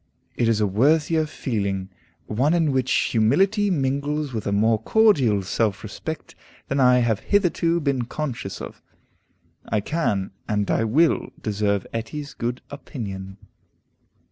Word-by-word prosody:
It 120 - +1
is 115 -2 +2
a 105 - +3
worthier 155 - +2
feeling, 100 -9 -3 0.3
one 135 +10 +1
in 165 -4 +2
which 130 -1 0
humility 190 - +2
mingles 145 -2 -1
with 110 -2 -3
a - - 0
more 110 +2 +2
cordial 135 - +3
self 100 +1 -1
respect 155 +9 -6 0.4
than 135 - 0
I 125 -1 +6
have 115 -3 +1
hitherto 170 -4 +1
been 140 -5 0
conscious 125 -7 -5
of. - - -9 0.9
I 110 - +1
can, 105 - -1 0.2
and 105 -1 0
I 115 - +1
will, 155 +9 +2
deserve 100 -2 -1
Etty's 140 +6 -5
good 120 +2 -4
opinion. 100 -9 -7
125 Hz, 135 wpm, -23 LUFS, 105-150 Hz, 0.9 s, I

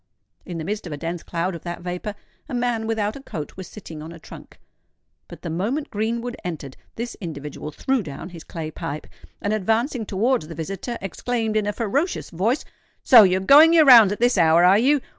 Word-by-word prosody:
In 175 -3 -5
the 160 - -4
midst 205 +1 -4
of 160 - -6
a - - -5
dense 170 +2 -4
cloud 170 +2 -3
of 170 - -7
that 175 -1 -6
vapour, 180 +4 -5 0.3
a 260 - -3
man 240 -2 -1
without 215 -2 -1
a 275 - -9
coat 155 - -7
was 190 -1 -8
sitting 165 -7 -10
on 160 +2 -8
a 170 - -10
trunk; - - -13 0.7
but - - -12
the - - -4
moment 225 - -2
Greenwood 235 +3 -2
entered, 150 -6 -6 0.2
this 235 +1 -5
individual 150 -3 -6
threw 260 - -1
down 150 0 -8
his 170 -3 -11
clay 160 -2 -6
pipe, 150 0 -6 0.4
and 205 - 0
advancing 225 +3 0
towards 225 -1 0
the 165 - -8
visitor, 195 +9 -5
exclaimed 220 +3 -2
in 215 -1 +1
a - - +1
ferocious 270 - -2
voice, 215 - 0 0.4
"So 240 -3 +9
you're 190 -2 +3
going 300 - +7
your 320 -2 +6
rounds 230 -7 +9
at 205 - -3
this 240 -4 +3
hour, 165 +1 +5
are 190 +3 +6
you? 280 +4 +3
205 Hz, 205 wpm, -23 LUFS, 170-235 Hz, 0.7 s, So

